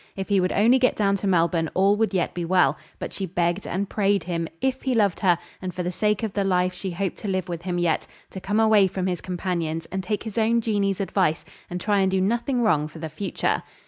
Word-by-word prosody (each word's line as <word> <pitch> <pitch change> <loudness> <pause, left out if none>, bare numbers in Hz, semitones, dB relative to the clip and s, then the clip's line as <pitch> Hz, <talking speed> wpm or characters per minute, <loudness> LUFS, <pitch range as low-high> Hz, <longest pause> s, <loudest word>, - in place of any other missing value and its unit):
If 195 +1 -5
he 200 -1 +3
would 180 - 0
only 235 +6 +4
get 255 - +3
down 200 -2 +2
to 200 - -3
Melbourne 170 -3 +2
all 195 +2 +4
would 225 0 +1
yet 185 -4 0
be 175 - -3
well; 180 +2 +3 0.2
but - - -6
she 195 - -3
begged 175 +2 -1
and 195 +3 -2
prayed 200 0 +1
him, 170 -1 -2
if 265 0 -1
he 260 -2 0
loved 205 -5 +2
her, 180 -4 +3 0.2
and 185 -2 -5
for 180 - -2
the 180 - -2
sake 210 +4 0
of 215 -3 -2
the 200 - 0
life 180 -1 +1
she 190 +1 -5
hoped 185 +2 -3
to - - -6
live 185 -2 -1
with 170 -2 -5
him 175 0 -3
yet, 170 -3 0 0.2
to 190 - -7
come 205 +3 0
away 215 -3 +5
from 185 0 -3
his 180 -2 -2
companions 170 -3 -3
and 190 0 -3
take 205 +2 -2
his 220 0 -3
own 230 +1 +3
Jeanie's 205 -4 0
advice, 185 -4 0 0.2
and 180 0 -4
try 205 +2 +1
and 190 -1 +3
do 190 0 +1
nothing 235 +6 0
wrong 155 -9 +2
for 155 - -12
the 160 0 -5
future. 175 +7 -1
190 Hz, 250 wpm, -24 LUFS, 175-205 Hz, 0.2 s, away